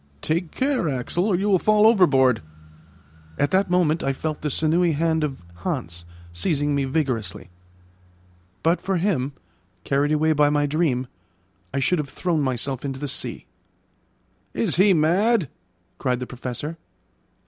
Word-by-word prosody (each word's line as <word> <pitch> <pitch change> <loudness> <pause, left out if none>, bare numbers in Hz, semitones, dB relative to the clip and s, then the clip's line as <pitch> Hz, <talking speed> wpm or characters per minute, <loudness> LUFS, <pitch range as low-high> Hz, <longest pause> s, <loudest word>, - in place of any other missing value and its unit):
"Take 165 +1 -1
care, 260 - 0
Axel, 140 +7 -1
or 200 - +2
you 195 +4 0
will 195 -3 +4
fall 215 +2 +4
overboard." 135 - +4 1.0
At 145 - +1
that 190 0 +2
moment 170 -3 +2
I 135 - 0
felt 155 +2 -4
the 150 - -1
sinewy 160 +4 +2
hand 160 +1 +1
of 135 -10 -4
Hans 85 -1 -4 0.3
seizing 145 - 0
me 140 -1 +1
vigorously. 125 - -2 1.1
But 165 +2 +2
for 195 -1 -1
him, 160 -7 0 0.5
carried 140 +5 +1
away 155 +1 +3
by 150 -1 +4
my 145 0 +2
dream, 145 -4 0 0.7
I - - -3
should 160 +5 +1
have 145 -2 -3
thrown 160 +2 -1
myself 130 -1 -2
into 135 -2 -4
the 145 - -3
sea. - - -3 1.1
"Is 115 - 0
he 195 +2 +6
mad?" 180 - +2 0.5
cried 125 -2 0
the 125 - -4
Professor. 125 +6 -6
150 Hz, 150 wpm, -23 LUFS, 135-175 Hz, 1.1 s, he